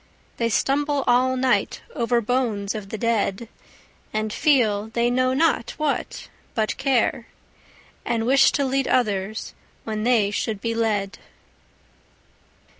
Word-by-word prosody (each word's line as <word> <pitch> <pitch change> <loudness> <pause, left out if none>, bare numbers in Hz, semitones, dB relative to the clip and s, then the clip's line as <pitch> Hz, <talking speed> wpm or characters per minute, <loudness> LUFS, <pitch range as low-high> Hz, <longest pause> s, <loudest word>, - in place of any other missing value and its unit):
They 230 -1 0
stumble 285 +4 +1
all 255 +1 +3
night 255 0 +1
over 235 0 +1
bones 225 -4 -1
of 210 -3 -7
the 220 - -4
dead; 225 -1 -1 0.6
And 215 0 -2
feel—they 235 -4 +2
know 255 +1 +1
not 315 -5 +1
what 305 -2 -2 0.3
but 220 -2 0
care; 260 -3 +1 0.8
And 225 -1 -1
wish 270 +3 +5
to 280 - +1
lead 270 0 0
others, 210 -3 -1 0.3
when 215 -1 -4
they 225 -4 +3
should 210 0 -2
be 230 +2 -2
led. 210 -4 -1
235 Hz, 120 wpm, -23 LUFS, 215-260 Hz, 0.8 s, wish